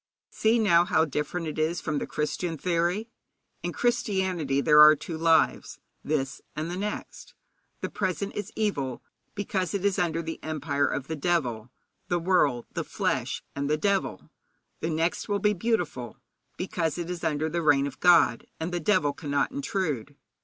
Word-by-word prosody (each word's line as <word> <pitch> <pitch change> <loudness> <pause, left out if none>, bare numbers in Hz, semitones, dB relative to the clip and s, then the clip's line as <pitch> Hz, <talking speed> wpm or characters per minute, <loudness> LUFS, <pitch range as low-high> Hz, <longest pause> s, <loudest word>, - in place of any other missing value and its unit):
See 220 +2 +2
now 175 -7 +5
how 160 -2 +2
different 150 +4 -3
it 155 0 -4
is 160 +3 +1
from 155 -3 -2
the - - -4
Christian 160 +2 -2
theory. 175 +6 0 0.5
In - - -3
Christianity 190 - 0
there 150 +1 +6
are 155 0 +10
two 160 +3 -6
lives 165 0 +2 0.3
this 135 -3 -2
and 155 +3 -3
the - - -3
next. 205 +3 -5 0.5
The - - -2
present 195 0 -2
is 205 0 -4
evil, 140 - -1 0.3
because 200 -3 -2
it 200 0 -2
is 200 -2 +2
under 165 -1 0
the 165 0 -6
empire 145 -2 0
of 135 - -2
the 160 - -4
devil 135 -8 -1 0.4
the 175 - +1
world, 165 -9 +2
the - - -2
flesh, - - -2
and 140 0 -2
the 150 - +2
devil. 190 - -1 0.5
The 165 - -2
next 165 +5 -1
will 205 - +2
be 210 +1 +2
beautiful, 175 - -2 0.4
because 170 -3 -2
it 170 -1 -3
is 175 -1 -5
under 155 -1 0
the 170 +2 -1
reign 145 -3 +4
of 140 - -6
God, 170 -9 +5
and 160 +2 -3
the 175 - -1
devil 155 -5 +2
cannot 145 -3 -1
intrude. 175 - -2
165 Hz, 170 wpm, -27 LUFS, 150-185 Hz, 0.5 s, are